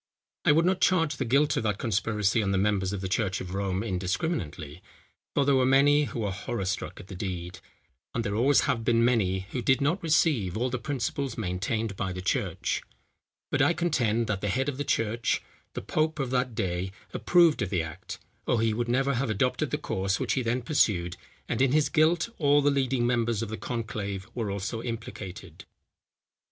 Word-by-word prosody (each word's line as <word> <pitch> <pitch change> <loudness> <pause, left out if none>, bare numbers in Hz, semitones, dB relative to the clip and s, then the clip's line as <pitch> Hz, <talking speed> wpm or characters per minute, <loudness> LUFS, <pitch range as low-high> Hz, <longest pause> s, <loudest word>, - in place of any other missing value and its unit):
I - - +6
would 165 +3 +4
not 185 +1 +1
charge 165 -6 +3
the 130 - -1
guilt 140 +5 +3
of - - +1
that 105 -3 0
conspiracy 105 -1 +1
on 100 - -1
the 100 - +1
members 100 -1 +1
of 100 -2 -4
the 95 - -2
church 95 0 0
of 90 0 -6
Rome 95 0 -1
indiscriminately, 90 - -3 0.5
for 140 - +3
there 140 - +4
were 130 -1 +4
many 140 +3 +5
who 120 - -5
were 100 -2 -1
horror 95 +2 -4
struck 100 +3 -3
at - - -10
the 95 - -10
deed, 90 -1 -5 0.6
and 115 - 0
there 100 - -2
always 125 +6 +4
have 115 -3 0
been 115 0 +3
many 100 -6 +2
who 125 - -2
did 130 +2 +3
not 160 +8 +1
receive 145 - +2
all 125 +2 0
the 130 - -2
principles 135 -1 -3
maintained 105 +2 -2
by 95 -1 -2
the 90 - -6
church; - - -1 0.7
but 145 - +2
I 145 +5 +4
contend, 125 -10 +1
that 105 -3 -2
the 105 - -1
head 130 +7 0
of 140 -3 -2
the 145 - -1
church, 115 -2 0 0.3
the - - -4
pope 155 0 0
of 135 -3 -2
that 125 -2 0
day, 90 0 -2 0.2
approved 170 -6 +4
of 100 - -1
the 90 -4 0
act, 80 +3 -8 0.3
or 120 - +2
he 110 -1 +2
would 120 +2 -2
never 135 +3 +2
have 125 0 -1
adopted 110 +4 0
the - - -1
course 95 +1 -1
which - - 0
he 135 - 0
then 120 +1 -1
pursued; 95 - +1 0.3
and - - -1
in 135 0 +3
his 155 -1 +3
guilt 160 +1 +3
all 145 -1 +4
the 145 - +4
leading 130 -3 +1
members 120 -2 +1
of 115 - -5
the 110 - -3
conclave 105 -4 -4
were 115 -4 -2
also 100 +3 -3
implicated. 105 -6 -7
115 Hz, 205 wpm, -28 LUFS, 95-135 Hz, 0.7 s, I